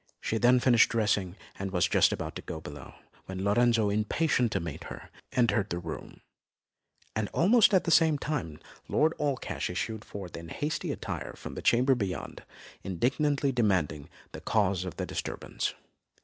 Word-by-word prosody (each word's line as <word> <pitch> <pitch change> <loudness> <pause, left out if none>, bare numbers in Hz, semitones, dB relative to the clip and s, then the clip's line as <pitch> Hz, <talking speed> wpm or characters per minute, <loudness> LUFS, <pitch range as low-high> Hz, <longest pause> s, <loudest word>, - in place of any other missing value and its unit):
She 110 - -1
then 125 +2 +5
finished 120 -2 +5
dressing, 105 -5 0 0.2
and 100 0 -3
was 90 -2 +2
just - - +4
about - - -4
to - - -6
go 80 - -6
below, 75 -4 -10 0.3
when 95 0 -4
Lorenzo, 110 0 +3
impatient 115 +4 +1
to - - +1
greet 80 -3 -6
her, - - -9 0.2
entered 120 -6 +2
the 85 - -2
room; 80 -3 -7 0.9
and 110 -2 -1
almost 220 +6 +5
at 190 -3 +4
the 170 - -1
same 160 -2 +5
time 135 - -3 0.3
Lord 160 +2 +2
Allcash 140 -3 -2
issued 110 -1 -3
forth 95 -5 -8
in 85 0 -8
hasty 150 - -2
attire - - -5
from - - -8
the - - -6
chamber 125 +3 +4
beyond, 100 -7 -4 0.4
indignantly 135 - +1
demanding 90 - 0 0.2
the - - -8
cause 100 -4 +1
of 90 - -6
the - - -2
disturbance. - - -4
110 Hz, 165 wpm, -29 LUFS, 95-135 Hz, 0.9 s, then